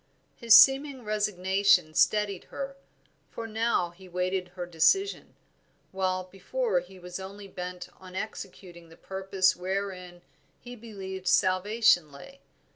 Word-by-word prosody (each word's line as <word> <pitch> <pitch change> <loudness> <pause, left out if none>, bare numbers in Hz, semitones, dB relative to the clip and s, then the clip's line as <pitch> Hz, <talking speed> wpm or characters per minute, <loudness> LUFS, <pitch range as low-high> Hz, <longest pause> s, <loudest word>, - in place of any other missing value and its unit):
His 235 -3 +6
seeming 270 -1 +5
resignation 195 -5 +2
steadied 205 0 +1
her, 275 0 -6 0.5
for 230 - -7
now 225 -5 0
he 185 +1 -16
waited 180 +1 -2
her 180 -1 -4
decision, 180 - +1 0.6
while 185 -1 -1
before 195 +3 -2
he 185 +2 -13
was 180 0 -8
only 200 +1 -9
bent 180 -1 -7
on 185 -1 -13
executing 180 -4 -8
the 165 - -16
purpose 190 0 0
wherein 180 -1 -5 0.4
he 245 0 -10
believed 190 -5 -8
salvation 185 -2 +3
lay. 275 - -13
190 Hz, 120 wpm, -28 LUFS, 180-215 Hz, 0.6 s, His